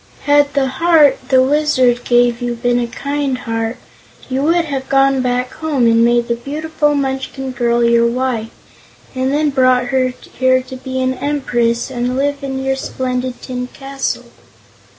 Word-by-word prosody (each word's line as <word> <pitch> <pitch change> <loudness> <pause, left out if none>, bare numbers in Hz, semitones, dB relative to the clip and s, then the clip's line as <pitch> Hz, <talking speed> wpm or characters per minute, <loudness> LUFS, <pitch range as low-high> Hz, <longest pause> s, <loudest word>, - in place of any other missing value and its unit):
Had 290 -1 +3
the 275 -1 +2
heart 295 +1 +3
the 260 -1 +5
Wizard 260 -4 +2
gave 240 0 +2
you 240 0 -2
been 245 +1 0
a 240 - -1
Kind 280 +1 -2
Heart, 225 -1 -3 0.5
you 260 +1 0
would 335 +3 +2
have 270 -3 -4
gone 270 -1 +3
back 250 0 -1
home 295 -6 0
and 230 0 +4
made 240 0 +2
the 235 - +1
beautiful 295 +4 -1
Munchkin 265 -1 -3
girl 240 -1 +1
your 235 0 +4
wife, 240 -2 -2 0.6
and 260 0 -1
then 295 +1 +1
brought 255 -2 +2
her 260 -1 +3 0.3
here 255 0 +3
to 260 0 -9
be 260 0 -5
an 255 0 +1
Empress 245 -4 -1
and 250 0 -2
live 285 +1 -1
in 265 -1 -3
your 270 0 0
splendid 255 -1 -4
tin 250 -1 -4
castle." 270 +1 -4
260 Hz, 165 wpm, -17 LUFS, 245-275 Hz, 0.6 s, the